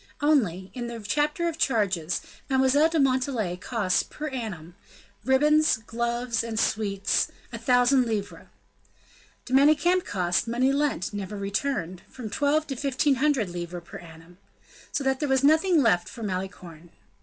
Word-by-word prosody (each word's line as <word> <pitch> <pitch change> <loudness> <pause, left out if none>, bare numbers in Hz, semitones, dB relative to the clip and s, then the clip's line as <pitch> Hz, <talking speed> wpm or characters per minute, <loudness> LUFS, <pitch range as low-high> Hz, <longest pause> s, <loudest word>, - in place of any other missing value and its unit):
Only, 205 - +1
in 245 -2 -5
the 235 -1 -6
chapter 295 - 0
of 330 -1 -4
charges, 185 - 0 0.3
Mademoiselle 265 +4 +3
de 325 -1 0
Montalais 255 -8 +1
cost 190 0 -1
per 305 0 -5
annum: 200 - -6 0.5
ribbons, 300 +3 +3
gloves, 235 +1 -2
and 225 -1 -3
sweets, 205 -3 0 0.2
a - - -5
thousand 250 0 +3
livres. 210 -3 -4 1.0
De 255 - -6
Manicamp 310 +6 +4
cost 180 +1 -1
money 250 +3 +1
lent, 280 - -1
never 205 0 -5
returned 195 -3 -3
from 230 -5 -8
twelve 295 +4 +1
to 275 -3 -5
fifteen 275 +1 +1
hundred 270 -6 +1
livres 175 0 -6
per 195 - -10
annum. 165 +1 -15 0.5
So 280 - -1
that 265 0 0
there 295 - -1
was 265 0 +2
nothing 315 +2 +4
left 180 -7 +2
for 235 - -9
Malicorne. 185 -4 -6
240 Hz, 145 wpm, -26 LUFS, 195-280 Hz, 1.0 s, Manicamp